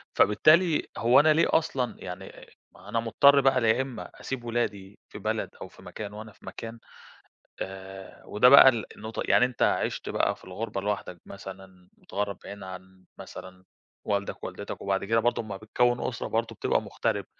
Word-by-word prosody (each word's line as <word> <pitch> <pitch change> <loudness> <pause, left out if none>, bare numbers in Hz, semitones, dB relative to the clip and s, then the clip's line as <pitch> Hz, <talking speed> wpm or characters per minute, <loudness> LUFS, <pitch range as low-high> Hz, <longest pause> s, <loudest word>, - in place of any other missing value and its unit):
فبالتالي 155 - +4
هو 120 +2 +5
أنا 155 +1 +5
ليه 165 - +3
أصلًا 135 -6 0
يعني 90 - -9 0.2
ما - - -19
هو - - -13
أنا 115 - 0
مضطر 140 +5 +5
بقى 130 -2 +3
يا 120 +4 +3
إما 130 -2 -6
أسيب 130 -3 -5
ولادي 105 -4 -3
في - - -9
بلد 110 +1 -2
أو - - -6
في - - -18
مكان 105 -1 -7
وأنا 110 +1 -9
في - - -20
مكان، 115 0 -8 0.8
آآ 95 0 -8
وده 115 +4 +4
بقى 140 0 +10
ال 115 -4 +1
النقطة 110 +1 -5
يعني 125 - +5
أنت 125 -1 -3
عِشت - - 0
بقى - - 0
في - - -18
الغُربة 95 +1 -5
لوحدك 100 -4 -4
مثلًا، 95 -2 -11
متغرب 100 -1 -4
بعيد 100 -1 -9
عن 95 0 -11
مثلًا 95 0 -11 0.4
والدك 100 -1 -2
ووالدتك، - - -7
وبعد 100 0 -1
كده 115 +2 +2
برضو 120 0 0
لمّا 100 -3 -7
بتكوّن 120 +4 +1
أُسرة 120 - -4
برضو 115 +1 -1
بتبقى - - 0
مُغترب، - - -2
110 Hz, 175 wpm, -27 LUFS, 95-120 Hz, 0.8 s, بقى